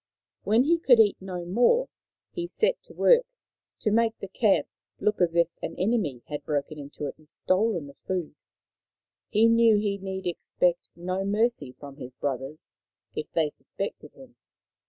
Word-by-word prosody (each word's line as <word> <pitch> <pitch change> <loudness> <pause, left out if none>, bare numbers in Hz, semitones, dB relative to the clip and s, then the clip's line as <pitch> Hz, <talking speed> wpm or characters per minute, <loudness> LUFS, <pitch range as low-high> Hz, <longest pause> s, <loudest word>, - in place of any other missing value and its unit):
When 220 +5 +3
he 335 +4 +3
could 250 -8 +5
eat 210 -3 +5
no 180 -2 -5
more 245 - +3 0.4
he 345 -2 -4
set 460 +7 0
to - - -15
work - - +5 0.6
to 215 - +1
make 225 +1 +2
the 195 - -7
camp 195 -5 +2 0.3
look 210 -2 0
as 170 -1 +2
if 170 -1 +4
an - - -5
enemy 185 - 0
had 145 -1 -5
broken 150 +1 -2
into 145 +1 -7
it 140 - -6
and 155 -1 -23
stolen 185 -3 0
the 140 - -11
food. 180 -5 -2 1.0
He 220 0 +4
knew 230 -1 +5
he 205 -1 -1
need 190 0 -5
expect 175 0 0
no 185 +2 -3
mercy 205 - 0
from 140 +1 -12
his 125 -3 -9
brothers 135 +2 -5 0.4
if 155 - -5
they 160 -2 +2
suspected - - -6
him. - - -16
190 Hz, 165 wpm, -27 LUFS, 155-225 Hz, 1.0 s, could